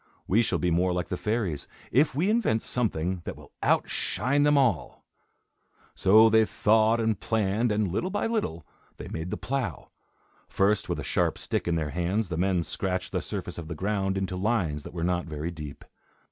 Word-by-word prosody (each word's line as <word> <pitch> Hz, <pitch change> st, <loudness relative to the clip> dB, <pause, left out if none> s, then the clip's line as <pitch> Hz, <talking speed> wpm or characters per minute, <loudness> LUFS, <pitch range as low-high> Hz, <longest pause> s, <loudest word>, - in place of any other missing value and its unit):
We 105 Hz, +5 st, +3 dB
shall 100 Hz, -6 st, 0 dB
be 85 Hz, +2 st, 0 dB
more 90 Hz, +2 st, +2 dB
like 90 Hz, 0 st, -2 dB
the -, -, -1 dB
fairies, 100 Hz, -8 st, -2 dB, 0.2 s
if 145 Hz, +3 st, +3 dB
we 180 Hz, +8 st, +2 dB
invent 210 Hz, -, +1 dB
something 95 Hz, -7 st, -1 dB
that -, -, -6 dB
will -, -, -15 dB
outshine 140 Hz, +3 st, +1 dB
them 145 Hz, 0 st, +4 dB
all." 100 Hz, -, 0 dB, 0.9 s
So 110 Hz, +4 st, +6 dB
they 110 Hz, 0 st, +5 dB
thought 110 Hz, +1 st, +3 dB
and 110 Hz, -3 st, 0 dB
planned, 110 Hz, +1 st, 0 dB
and, 105 Hz, 0 st, +1 dB
little 175 Hz, -, -1 dB
by 205 Hz, -, -1 dB
little, 210 Hz, -, -2 dB, 0.3 s
they -, -, -8 dB
made 80 Hz, +2 st, -4 dB
the -, -, -3 dB
plough. 130 Hz, -, -3 dB, 0.6 s
First, 100 Hz, +2 st, +1 dB
with -, -, -1 dB
a -, -, -4 dB
sharp -, -, 0 dB
stick -, -, -2 dB
in 85 Hz, -, +1 dB
their 75 Hz, -3 st, -1 dB
hands, 90 Hz, +5 st, -1 dB
the 80 Hz, -, -3 dB
men 90 Hz, -1 st, +1 dB
scratched 90 Hz, +1 st, -2 dB
the -, -, -1 dB
surface -, -, -5 dB
of 80 Hz, -, -7 dB
the 85 Hz, -, -5 dB
ground 95 Hz, +1 st, -1 dB
into 95 Hz, -1 st, -2 dB
lines 90 Hz, -7 st, 0 dB
that -, -, -9 dB
were 85 Hz, -, -2 dB
not 90 Hz, 0 st, 0 dB
very 80 Hz, +2 st, -4 dB
deep. 75 Hz, -4 st, -9 dB
95 Hz, 190 wpm, -27 LUFS, 85-115 Hz, 0.9 s, So